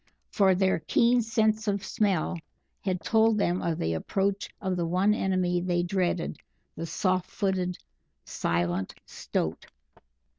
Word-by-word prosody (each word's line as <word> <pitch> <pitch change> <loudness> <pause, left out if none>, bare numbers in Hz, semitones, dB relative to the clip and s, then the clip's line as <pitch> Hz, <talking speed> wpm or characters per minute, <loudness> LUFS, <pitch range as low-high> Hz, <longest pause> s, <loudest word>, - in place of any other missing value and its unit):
For 195 -3 +4
their 190 -1 +2
keen 235 +9 +3
sense 220 -1 +1
of 200 -1 0
smell 185 -4 0 0.4
had 185 -2 -1
told 225 -1 +3
them 180 -3 +1
of 165 -2 -1
the 80 0 -1
approach 195 - -1
of 190 -2 -1
the 170 -2 -1
one 185 +5 +3
enemy 185 -3 +1
they 175 -1 0
dreaded 175 - -1 0.4
the 165 - -5
soft 185 +2 0
footed, 185 -3 -1 0.5
silent 85 +2 -1
Stoat. - - -3
185 Hz, 135 wpm, -28 LUFS, 175-205 Hz, 0.5 s, For